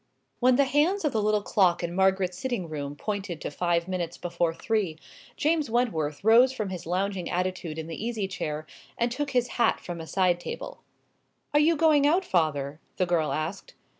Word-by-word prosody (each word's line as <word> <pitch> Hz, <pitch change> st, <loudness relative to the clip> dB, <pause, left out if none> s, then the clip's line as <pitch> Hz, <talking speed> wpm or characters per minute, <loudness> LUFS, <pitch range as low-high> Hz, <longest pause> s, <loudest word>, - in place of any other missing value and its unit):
When 255 Hz, 0 st, +5 dB
the 280 Hz, -, +5 dB
hands 315 Hz, +7 st, +2 dB
of 300 Hz, -, +2 dB
the 220 Hz, -, 0 dB
little 210 Hz, 0 st, +1 dB
clock 180 Hz, -5 st, +2 dB
in 170 Hz, 0 st, -2 dB
Margaret's 190 Hz, -1 st, +2 dB
sitting 235 Hz, -3 st, -3 dB
room 145 Hz, -2 st, -5 dB
pointed 195 Hz, -2 st, -4 dB
to -, -, -4 dB
five 170 Hz, +2 st, 0 dB
minutes 175 Hz, -3 st, -3 dB
before 170 Hz, -1 st, -1 dB
three, 190 Hz, -2 st, -1 dB, 0.4 s
James 310 Hz, -3 st, +1 dB
Wentworth 195 Hz, -12 st, 0 dB
rose 235 Hz, +4 st, +6 dB
from 215 Hz, -6 st, -3 dB
his 180 Hz, -3 st, -6 dB
lounging 185 Hz, 0 st, -1 dB
attitude 180 Hz, -3 st, -2 dB
in 160 Hz, -, -4 dB
the 165 Hz, +5 st, -6 dB
easy 225 Hz, -4 st, -2 dB
chair, 155 Hz, -5 st, -4 dB, 0.3 s
and 235 Hz, 0 st, +1 dB
took 285 Hz, +4 st, -2 dB
his 250 Hz, -3 st, +1 dB
hat 230 Hz, -, +3 dB
from 175 Hz, -2 st, -6 dB
a 160 Hz, -, -8 dB
side 180 Hz, -2 st, +2 dB
table. 175 Hz, -, -7 dB, 0.7 s
"Are 295 Hz, -, +5 dB
you 320 Hz, +3 st, +4 dB
going 300 Hz, -2 st, +4 dB
out, 355 Hz, +5 st, +2 dB
father?" 150 Hz, -, 0 dB, 0.2 s
the 185 Hz, -, +2 dB
girl 170 Hz, -3 st, +1 dB
asked. 155 Hz, +6 st, -4 dB
190 Hz, 190 wpm, -27 LUFS, 170-240 Hz, 0.7 s, rose